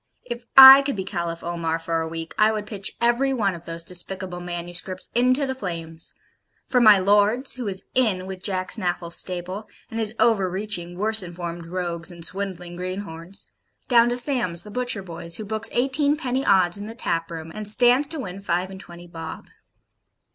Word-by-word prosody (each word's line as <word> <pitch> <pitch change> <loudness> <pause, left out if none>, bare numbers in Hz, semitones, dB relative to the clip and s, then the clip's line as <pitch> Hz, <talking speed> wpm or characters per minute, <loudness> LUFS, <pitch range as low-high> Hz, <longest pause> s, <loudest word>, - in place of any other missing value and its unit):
If 240 -1 -7
I 270 +1 +12
could 275 -2 -2
be 190 - -3
Caliph 170 -3 -4
Omar 170 -1 -2
for 165 0 -2
a 160 - -3
week, 165 0 -6
I 215 +1 +4
would 215 -1 -4
pitch 200 -2 -5
every 240 +3 +2
one 205 -6 0
of 170 0 -10
those 165 0 -4
despicable 180 +1 -4
manuscripts 175 +1 -1
into 255 +4 +2
the 265 - -2
flames; 165 -8 -6 0.5
from 250 -2 +2
my 215 -2 +8
Lord's, 205 +7 +2
who 250 -4 -6
is 190 -1 -1
'in' 210 -8 +1
with 190 -1 -8
Jack 185 -1 -2
Snaffle's 175 -4 -2
stable, 185 +4 -4 0.2
and 225 - -4
is 220 0 -3
over 200 -5 +3
reaching 180 -2 -4
worse 215 +2 +4
informed 170 -1 -7
rogues 175 -1 -3
and 170 -2 -3
swindling 180 -3 -3
greenhorns, 185 0 -7 0.4
down 235 -1 +5
to 245 - -1
Sam's, 235 - 0
the 210 - -11
butcher 245 -4 -2
boy's, 170 -1 -6
who 215 - -6
books 220 +2 -1
eighteenpenny 265 +1 0
odds 185 -1 +4
in 205 - -7
the 225 - -9
tap 165 -8 -2
room, 165 -1 -7
and 215 -1 -6
'stands 250 +5 +3
to 315 +1 -4
win 195 -5 -7
five 185 0 -2
and 190 - -9
twenty 175 -1 -12
bob.' 165 -2 -9
190 Hz, 185 wpm, -23 LUFS, 175-230 Hz, 0.5 s, I